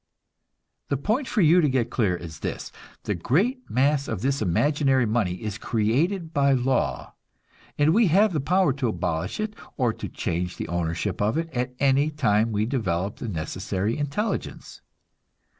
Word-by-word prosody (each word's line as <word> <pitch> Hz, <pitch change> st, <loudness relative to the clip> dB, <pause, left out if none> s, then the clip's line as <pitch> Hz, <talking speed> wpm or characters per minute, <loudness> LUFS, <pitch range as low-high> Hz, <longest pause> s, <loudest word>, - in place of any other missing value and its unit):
The 140 Hz, -, +1 dB
point 220 Hz, -, -1 dB
for 215 Hz, -, +1 dB
you 170 Hz, +2 st, +6 dB
to 150 Hz, -, +2 dB
get 125 Hz, -3 st, 0 dB
clear 100 Hz, -8 st, +1 dB
is 80 Hz, -3 st, -9 dB
this: -, -, -5 dB, 0.3 s
The 105 Hz, -, -1 dB
great 200 Hz, -, 0 dB
mass 140 Hz, +2 st, +2 dB
of 95 Hz, -, -4 dB
this 140 Hz, -1 st, 0 dB
imaginary 135 Hz, -, +2 dB
money 105 Hz, -5 st, 0 dB
is 105 Hz, +2 st, -5 dB
created 155 Hz, -, 0 dB
by 140 Hz, -1 st, +3 dB
law, 130 Hz, +1 st, 0 dB, 0.6 s
and 150 Hz, +2 st, +4 dB
we 225 Hz, 0 st, +4 dB
have 195 Hz, +4 st, +4 dB
the 155 Hz, -, 0 dB
power 180 Hz, +1 st, +2 dB
to 135 Hz, -2 st, -1 dB
abolish 90 Hz, -, -2 dB
it 215 Hz, 0 st, -3 dB, 0.2 s
or 125 Hz, -4 st, +1 dB
to -, -, -7 dB
change 90 Hz, +1 st, -3 dB
the -, -, -5 dB
ownership 85 Hz, +3 st, -2 dB
of 105 Hz, +7 st, +1 dB
it 165 Hz, 0 st, -2 dB
at 125 Hz, 0 st, -2 dB
any 140 Hz, +2 st, +3 dB
time 115 Hz, -7 st, +1 dB
we 105 Hz, 0 st, 0 dB
develop 100 Hz, -7 st, -2 dB
the 120 Hz, -, -6 dB
necessary 95 Hz, +4 st, -2 dB
intelligence. 150 Hz, +10 st, -3 dB
130 Hz, 165 wpm, -25 LUFS, 105-150 Hz, 0.6 s, you